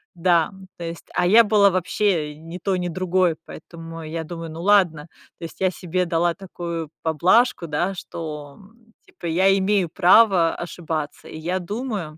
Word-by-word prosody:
да. 170 Hz, -2 st, +2 dB, 0.3 s
То 170 Hz, -, -6 dB
есть, 165 Hz, 0 st, -7 dB
а 180 Hz, 0 st, +1 dB
я 225 Hz, +5 st, +7 dB
была 205 Hz, -2 st, +4 dB
вообще 185 Hz, -4 st, 0 dB
ни 165 Hz, +3 st, -9 dB
той 185 Hz, 0 st, -1 dB
ни 180 Hz, -, -2 dB
другой, 185 Hz, -1 st, +1 dB
поэтому 165 Hz, 0 st, -10 dB
я 160 Hz, +1 st, -5 dB
думаю: 165 Hz, 0 st, -7 dB
"Ну, 165 Hz, +2 st, -7 dB
ладно". 180 Hz, -7 st, +3 dB, 0.3 s
То -, -, -13 dB
есть 165 Hz, -, -11 dB
я 190 Hz, -, +3 dB
себе 180 Hz, 0 st, -2 dB
дала 170 Hz, 0 st, +1 dB
такую 170 Hz, -4 st, -6 dB
поблажку, 170 Hz, -, +2 dB
да, 170 Hz, +5 st, -1 dB
что, 150 Hz, -5 st, -7 dB
м, 225 Hz, +3 st, -21 dB
типа -, -, -13 dB
я 190 Hz, +4 st, +3 dB
имею 190 Hz, -2 st, +1 dB
право 185 Hz, -1 st, +5 dB
ошибаться, 160 Hz, -3 st, -5 dB
и -, -, -9 dB
я 175 Hz, +4 st, -2 dB
думаю, 200 Hz, -5 st, -5 dB
175 Hz, 170 wpm, -22 LUFS, 165-190 Hz, 0.3 s, я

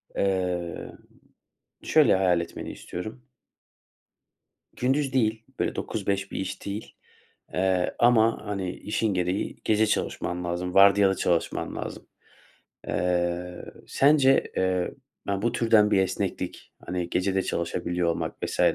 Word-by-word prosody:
Eee, 90 Hz, -3 st, -1 dB, 0.9 s
şöyle -, -, +5 dB
hayal 90 Hz, -2 st, +3 dB
etmeni 85 Hz, -, -6 dB
istiyorum. 110 Hz, +8 st, -8 dB, 1.5 s
Gündüz 135 Hz, +2 st, 0 dB
değil, 110 Hz, -3 st, +1 dB, 0.2 s
böyle -, -, 0 dB
9-5 100 Hz, -2 st, -2 dB
bir -, -, -4 dB
iş 95 Hz, -1 st, -5 dB
değil, 100 Hz, +2 st, -6 dB, 0.6 s
eee, 95 Hz, -1 st, +1 dB
ama 115 Hz, -1 st, +4 dB
hani, 100 Hz, -3 st, -2 dB
işin 105 Hz, 0 st, -1 dB
gereği 90 Hz, +2 st, -1 dB
gece 110 Hz, 0 st, +3 dB
çalışman 90 Hz, -3 st, -2 dB
lazım, 90 Hz, +1 st, -3 dB
vardiyalı 100 Hz, 0 st, +6 dB
çalışman 85 Hz, -2 st, -1 dB
lazım. -, -, -6 dB, 0.8 s
Eee, 90 Hz, 0 st, -1 dB, 0.2 s
sence, 135 Hz, -1 st, +4 dB
eee, 95 Hz, -1 st, +1 dB, 0.4 s
ya, 100 Hz, -1 st, -1 dB
bu 120 Hz, -, +1 dB
türden 110 Hz, -3 st, +4 dB
bir 100 Hz, -, +4 dB
esneklik, 95 Hz, -, -2 dB
hani, 90 Hz, -1 st, -2 dB
gece 95 Hz, +1 st, 0 dB
de 95 Hz, -, +2 dB
çalışabiliyor 85 Hz, 0 st, -1 dB
olmak 85 Hz, -, -2 dB
vs. -, -, -3 dB
95 Hz, 120 wpm, -26 LUFS, 90-110 Hz, 1.5 s, vardiyalı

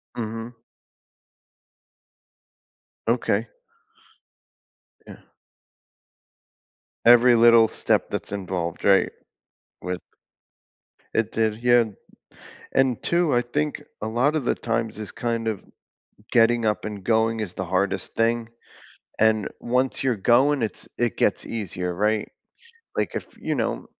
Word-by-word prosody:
Mhm. 115 Hz, +1 st, -5 dB, 2.5 s
Okay. -, -, +1 dB, 1.6 s
Yeah. -, -, -10 dB, 1.9 s
Every 120 Hz, +1 st, +7 dB
little 115 Hz, -1 st, +7 dB
step -, -, 0 dB
that's -, -, -5 dB
involved, 90 Hz, -4 st, -4 dB
right? 100 Hz, -1 st, +4 dB, 0.7 s
With 90 Hz, 0 st, -4 dB, 1.1 s
it 115 Hz, -1 st, 0 dB
did, 110 Hz, -1 st, +1 dB
yeah. 120 Hz, -1 st, +5 dB, 0.9 s
And 130 Hz, -3 st, +2 dB
2, 170 Hz, -3 st, +1 dB
I 120 Hz, 0 st, +3 dB
think 150 Hz, +5 st, -2 dB, 0.2 s
a 110 Hz, -, -2 dB
lotta 135 Hz, +8 st, +1 dB
the 125 Hz, -, 0 dB
times 115 Hz, -1 st, -2 dB
is 105 Hz, -, -7 dB
kind 115 Hz, -1 st, -2 dB
of 110 Hz, -3 st, -3 dB, 0.7 s
getting 115 Hz, 0 st, +4 dB
up 105 Hz, -, 0 dB
and 105 Hz, -3 st, -6 dB
going 115 Hz, 0 st, +2 dB
is 100 Hz, -5 st, -5 dB
the 95 Hz, -, -3 dB
hardest 95 Hz, +1 st, -1 dB
thing, 115 Hz, 0 st, +1 dB, 0.7 s
and 110 Hz, -1 st, +3 dB
once 125 Hz, +2 st, 0 dB
you're 130 Hz, -4 st, +1 dB
going, 125 Hz, +6 st, +3 dB
it's 110 Hz, -, -4 dB
it 120 Hz, -2 st, 0 dB
gets -, -, +1 dB
easier, 90 Hz, -5 st, -4 dB
right? 105 Hz, +3 st, 0 dB, 0.7 s
Like, -, -, -1 dB
if -, -, -5 dB
you -, -, -2 dB
know, -, -, -2 dB
115 Hz, 115 wpm, -24 LUFS, 105-120 Hz, 2.5 s, Every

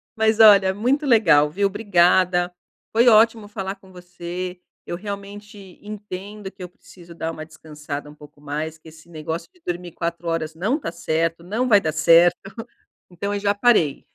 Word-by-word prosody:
Mas 220 Hz, 0 st, +1 dB
olha, 200 Hz, -3 st, +7 dB
muito 255 Hz, +9 st, 0 dB
legal 170 Hz, -, +4 dB
viu? 200 Hz, +6 st, 0 dB
Obrigada. 180 Hz, -3 st, +2 dB, 0.4 s
Foi 235 Hz, +2 st, +3 dB
ótimo 225 Hz, -1 st, +4 dB
falar 195 Hz, -2 st, -5 dB
com 190 Hz, -1 st, -20 dB
você, 180 Hz, 0 st, -7 dB, 0.2 s
eu -, -, -5 dB
realmente 200 Hz, 0 st, -9 dB
entendo 205 Hz, -1 st, -8 dB
que 190 Hz, -, -11 dB
eu 180 Hz, -, -8 dB
preciso 175 Hz, -1 st, -16 dB
dar 165 Hz, -1 st, -4 dB
uma 155 Hz, -1 st, -8 dB
descansada 150 Hz, -2 st, -8 dB
um 150 Hz, -, -14 dB
pouco 150 Hz, -1 st, -17 dB
mais, 155 Hz, +2 st, -5 dB
que 160 Hz, -, -18 dB
esse 160 Hz, +1 st, -18 dB
negócio 160 Hz, +1 st, -6 dB
de 360 Hz, -, -28 dB
dormir 175 Hz, 0 st, -5 dB
4 170 Hz, +1 st, -5 dB
horas 165 Hz, -1 st, -3 dB
não 215 Hz, -, -1 dB
tá 165 Hz, -, -5 dB
certo, 165 Hz, 0 st, -2 dB
não 220 Hz, +8 st, -2 dB
vai 210 Hz, -4 st, +6 dB
dar 160 Hz, -5 st, -2 dB
certo, 170 Hz, +4 st, +3 dB, 0.5 s
então 200 Hz, +3 st, -4 dB
eu 205 Hz, -, -2 dB
já 200 Hz, 0 st, 0 dB
parei. 205 Hz, -, +2 dB
180 Hz, 175 wpm, -22 LUFS, 165-205 Hz, 0.5 s, olha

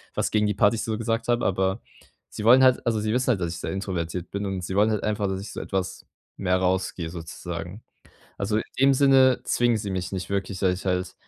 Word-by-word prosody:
was -, -, 0 dB
gegen 105 Hz, -1 st, +2 dB
die 105 Hz, -, -1 dB
Partys 105 Hz, +2 st, +2 dB
so 110 Hz, -1 st, -2 dB
gesagt 115 Hz, 0 st, -2 dB
habe, 120 Hz, 0 st, +1 dB
aber 95 Hz, +2 st, 0 dB, 0.5 s
sie 105 Hz, -, -7 dB
wollen 125 Hz, +3 st, +7 dB
halt 130 Hz, -1 st, +4 dB
also, 110 Hz, -2 st, +1 dB
sie 110 Hz, +1 st, -1 dB
wissen 125 Hz, +1 st, 0 dB
halt, 110 Hz, -7 st, +2 dB
dass 85 Hz, -1 st, -2 dB
ich 85 Hz, -, -7 dB
sehr -, -, -4 dB
introvertiert 90 Hz, -3 st, -4 dB
bin, 100 Hz, +1 st, -3 dB
und 95 Hz, -2 st, -3 dB
sie 95 Hz, -, -4 dB
wollen 105 Hz, +2 st, +4 dB
halt 105 Hz, -, -1 dB
einfach, 105 Hz, -1 st, 0 dB
dass 95 Hz, 0 st, -2 dB
ich 100 Hz, -, -8 dB
so -, -, -5 dB
etwas 95 Hz, -1 st, -4 dB, 0.3 s
mehr 90 Hz, -1 st, +1 dB
rausgehe, 95 Hz, -2 st, -1 dB
sozusagen. 85 Hz, +3 st, -7 dB, 0.6 s
Also, 105 Hz, +2 st, -1 dB
in -, -, -2 dB, 0.2 s
dem 135 Hz, 0 st, +5 dB
Sinne 130 Hz, -2 st, +5 dB
zwingen 120 Hz, -1 st, +2 dB
sie 105 Hz, -2 st, -4 dB
mich 95 Hz, 0 st, -3 dB
nicht 95 Hz, -1 st, -4 dB
wirklich, 100 Hz, -1 st, -2 dB
dass 95 Hz, -2 st, +2 dB
ich -, -, -10 dB
halt 90 Hz, 0 st, -1 dB
100 Hz, 235 wpm, -25 LUFS, 95-110 Hz, 0.6 s, wollen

